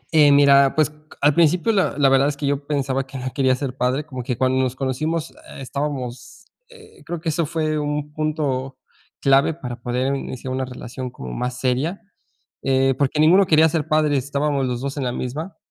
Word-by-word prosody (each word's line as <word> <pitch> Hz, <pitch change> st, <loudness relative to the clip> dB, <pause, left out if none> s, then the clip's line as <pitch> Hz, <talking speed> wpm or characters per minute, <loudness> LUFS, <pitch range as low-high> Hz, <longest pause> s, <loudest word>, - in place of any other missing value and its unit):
Eh, 145 Hz, -2 st, +7 dB
mira, 140 Hz, -1 st, +5 dB
pues 155 Hz, -1 st, +3 dB
c -, -, -20 dB, 0.3 s
a -, -, +1 dB
al 150 Hz, -, +4 dB
principio, 170 Hz, +6 st, +3 dB
la 195 Hz, -8 st, +1 dB
la 140 Hz, -2 st, +4 dB
verdad 135 Hz, +1 st, +4 dB
es 145 Hz, -1 st, -2 dB
que 145 Hz, -, -3 dB
yo 140 Hz, 0 st, -1 dB
pensaba 135 Hz, -2 st, -1 dB
que 135 Hz, 0 st, -8 dB
no 130 Hz, 0 st, -4 dB
quería 130 Hz, -2 st, +2 dB
ser 130 Hz, -1 st, -4 dB
padre, 130 Hz, +3 st, 0 dB
como 130 Hz, -4 st, -6 dB
que 120 Hz, -1 st, -3 dB
cuando 130 Hz, +1 st, +2 dB
nos 130 Hz, -1 st, -1 dB
conocimos 150 Hz, +5 st, -2 dB
eh, -, -, -13 dB
estábamos 130 Hz, +2 st, -5 dB, 0.2 s
eh, 445 Hz, -3 st, -17 dB
creo 175 Hz, -1 st, -5 dB
que 160 Hz, -, -3 dB
eso 160 Hz, 0 st, 0 dB
fue 155 Hz, -1 st, -1 dB
un 150 Hz, 0 st, -3 dB
punto 145 Hz, -4 st, -2 dB, 0.4 s
clave 140 Hz, +3 st, +3 dB
para 120 Hz, -6 st, -7 dB
poder 130 Hz, +3 st, -1 dB
iniciar 130 Hz, -1 st, -5 dB
una 130 Hz, 0 st, -2 dB
relación 125 Hz, 0 st, -7 dB
como 65 Hz, -, -8 dB
más 125 Hz, -, -3 dB
seria. 135 Hz, +9 st, -1 dB, 0.6 s
Eh, 135 Hz, 0 st, +2 dB
porque 140 Hz, +2 st, 0 dB
ninguno 180 Hz, +6 st, +6 dB
quería 160 Hz, 0 st, +5 dB
ser 155 Hz, -1 st, -2 dB
padre, 155 Hz, -2 st, +2 dB
estábamos 140 Hz, 0 st, -1 dB
los 125 Hz, 0 st, -3 dB
2 140 Hz, +1 st, -4 dB
en 140 Hz, -, -2 dB
la 125 Hz, -, -1 dB
misma. 150 Hz, +10 st, -5 dB
140 Hz, 205 wpm, -21 LUFS, 130-155 Hz, 0.6 s, Eh